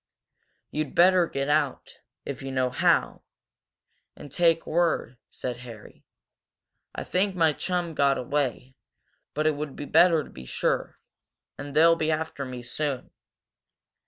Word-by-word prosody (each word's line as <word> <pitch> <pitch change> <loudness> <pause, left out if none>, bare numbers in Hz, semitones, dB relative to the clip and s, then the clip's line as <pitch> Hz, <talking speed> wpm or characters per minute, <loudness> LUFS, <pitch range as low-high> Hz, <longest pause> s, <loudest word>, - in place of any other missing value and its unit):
"You'd 150 -2 -3
better 180 0 +5
get 140 -2 -3
out, 145 -2 -1 0.3
if 140 -3 -5
you 135 0 -5
know 130 -1 0
how, - - +2 0.9
and 145 - -11
take 165 0 +2
word," 165 -7 0
said 125 -2 -5
Harry. 115 -4 -12 0.9
"I - - -4
think 190 +1 0
my 165 -3 +3
chum 175 0 -2
got 140 -2 +2
away, 130 -1 -2 0.6
but 155 +1 0
it 155 - +5
would 145 -1 -5
be 145 - -6
better 165 0 +5
to - - -13
be 65 - -11
sure. - - -1 0.6
And 145 -1 -7
they'll 165 +2 +6
be 160 -1 -1
after 155 -3 -2
me 125 -1 -7
soon." 135 +2 -3
145 Hz, 140 wpm, -26 LUFS, 130-165 Hz, 0.9 s, they'll